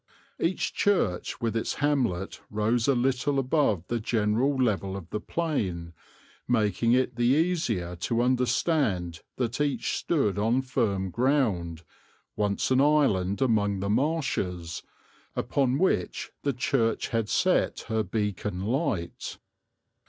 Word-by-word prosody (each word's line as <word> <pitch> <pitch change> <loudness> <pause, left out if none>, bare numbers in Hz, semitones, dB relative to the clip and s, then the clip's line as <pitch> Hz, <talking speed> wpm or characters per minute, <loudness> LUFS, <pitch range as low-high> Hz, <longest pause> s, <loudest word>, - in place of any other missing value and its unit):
Each 170 +3 0
church 185 - 0
with 115 -1 -1
its 115 - -1
hamlet 125 -11 0
rose 110 +3 +1
a 140 - +4
little 130 +3 +1
above 130 - +1
the 120 +3 -2
general 115 +5 +1
level 100 -6 0
of 90 -4 -9
the 105 - -2
plain, 100 - -2 0.5
making 115 0 +2
it 125 -1 +1
the 120 0 +2
easier 125 - 0
to 115 +7 0
understand 125 - +1
that 125 +2 -2
each 145 -2 0
stood 105 - 0
on 115 +5 +2
firm 100 -7 -1
ground, 105 - 0 0.5
once 105 +3 0
an 130 +1 +4
island 135 -9 +2
among 105 -5 +1
the 100 +1 -1
marshes, 105 - -1 0.5
upon 135 -2 +1
which 155 - 0
the 140 - 0
church 120 -2 0
had 115 -2 -1
set - - +2
her 110 0 -1
beacon 105 -2 -2
light. 110 - -2
115 Hz, 125 wpm, -27 LUFS, 100-135 Hz, 0.5 s, a